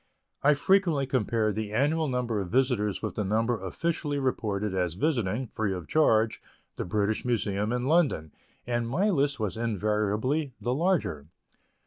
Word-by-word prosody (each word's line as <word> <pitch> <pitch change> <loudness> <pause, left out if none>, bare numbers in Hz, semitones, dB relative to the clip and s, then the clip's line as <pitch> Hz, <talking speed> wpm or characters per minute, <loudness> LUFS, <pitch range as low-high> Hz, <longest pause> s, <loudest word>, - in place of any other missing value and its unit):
I 150 +1 +5
frequently 170 -3 +2
compared 115 -4 0
the 110 0 -4
annual 150 +7 +1
number 125 -4 -1
of 90 - -5
visitors 120 -5 +1
with - - -2
the 105 - -2
number 110 +1 0
officially 150 - -2
reported 105 -7 -1
as 90 -3 -1
visiting 120 - 0
(free 110 -4 -2
of 90 -3 -7
charge), 115 -8 +3 0.3
the - - -4
British 105 +3 0
Museum 105 -3 0
in 125 0 -1
London, 140 - +2 0.3
and 120 -1 -1
my 195 - +2
list 140 -5 +1
was 105 -2 -2
invariably 110 - 0
the 120 - -1
larger. 140 - 0
115 Hz, 150 wpm, -28 LUFS, 105-140 Hz, 0.3 s, I